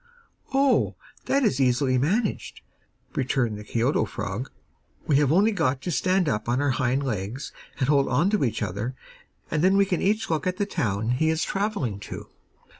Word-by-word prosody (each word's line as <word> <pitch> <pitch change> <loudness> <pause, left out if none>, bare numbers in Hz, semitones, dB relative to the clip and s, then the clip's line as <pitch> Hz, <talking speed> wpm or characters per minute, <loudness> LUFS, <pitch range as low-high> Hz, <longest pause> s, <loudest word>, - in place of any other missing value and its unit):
'Oh, 270 0 +2 0.3
that 275 0 +2
is 140 - +2
easily 130 0 +2
managed,' 200 - -1 0.5
returned 125 -4 0
the - - -8
Kioto 115 +4 +1
frog. 105 +3 -5 0.6
'We 145 - +3
have 145 -1 +3
only 200 +7 +4
got 140 -9 0
to 180 - -2
stand 185 +5 +1
up 105 -4 -1
on 125 +2 +1
our 145 -1 +2
hind 130 +2 0
legs, 115 +1 -4 0.3
and 130 - +1
hold 140 -1 +3
on 150 +10 +2
to 210 - +2
each 115 -4 -1
other, 105 +6 -3 0.6
and 155 - 0
then 190 +2 +4
we 200 - +5
can 185 -3 -1
each 215 +3 +1
look 160 0 -1
at 180 0 -1
the 205 - 0
town 110 - -1
he 160 +6 +2
is 160 +1 +1
travelling 195 - -2
to. - - -8
140 Hz, 185 wpm, -25 LUFS, 120-185 Hz, 0.6 s, we